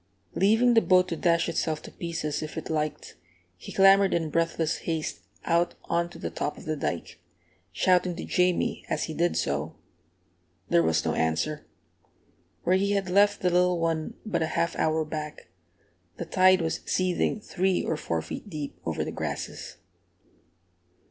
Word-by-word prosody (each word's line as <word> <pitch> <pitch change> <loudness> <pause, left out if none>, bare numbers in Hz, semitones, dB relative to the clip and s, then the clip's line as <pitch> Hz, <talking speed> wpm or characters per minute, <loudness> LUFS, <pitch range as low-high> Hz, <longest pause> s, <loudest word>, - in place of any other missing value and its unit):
Leaving 225 +5 +4
the 225 - +6
boat 185 -2 +4
to 170 - -3
dash 170 0 +2
itself 160 -2 -1
to - - -11
pieces 165 -3 -3
if 155 +1 -6
it 160 - -5
liked, 155 -1 -3 0.4
he 90 - -10
clambered 195 0 +5
in 165 -2 -1
breathless 165 0 0
haste 160 -2 -2 0.3
out 170 0 +1
on 170 0 0
to - - -12
the - - -5
top 150 - -3
of - - -11
the 155 0 -1
dike, 85 - -4 0.5
shouting 180 -1 +2
to - - -6
Jamie 180 -1 +1
as - - -1
he 160 - -4
did 170 +3 +1
so. - - -2 0.9
There 85 - +5
was 80 -1 +1
no - - +1
answer. 80 - -1 1.0
Where 185 +2 +3
he 200 +1 +1
had 195 -2 -1
left 205 +1 +4
the 180 - +2
little 180 0 +3
one 165 -1 -1
but 175 -6 -1
a 160 - +1
half 170 - +1
hour 160 0 +1
back, 150 - -6 0.7
the - - -4
tide 185 -1 +4
was 160 - -1
seething 185 +3 0
three 190 -2 0
or 160 - -1
four 85 - -2
feet 205 - -7
deep 150 -5 -6
over - - -2
the - - -4
grasses. - - -5
170 Hz, 170 wpm, -27 LUFS, 155-185 Hz, 1.0 s, the